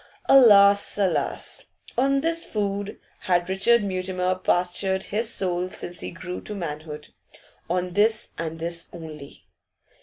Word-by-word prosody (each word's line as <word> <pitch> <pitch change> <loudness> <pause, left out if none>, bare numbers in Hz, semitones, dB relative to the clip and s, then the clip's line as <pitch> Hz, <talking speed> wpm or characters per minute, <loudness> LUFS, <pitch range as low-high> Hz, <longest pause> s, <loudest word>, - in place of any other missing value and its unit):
Alas, 205 -7 +6
alas! 195 -3 -1 0.3
On 275 +2 +2
this 330 +2 0
food 205 -1 -3 0.2
had 175 -1 0
Richard 210 +4 +3
Mutimer 185 -1 -1
pastured 185 +1 0
his 220 +2 -1
soul 180 -1 -1
since 175 -1 -5
he - - -4
grew 180 +1 -7
to 210 - -7
manhood, 150 -4 -6 0.6
on 180 0 -1
this 215 +3 +2
and 165 -1 -5
this 170 +1 -4
only. 155 -4 -10
185 Hz, 125 wpm, -24 LUFS, 175-205 Hz, 0.6 s, Alas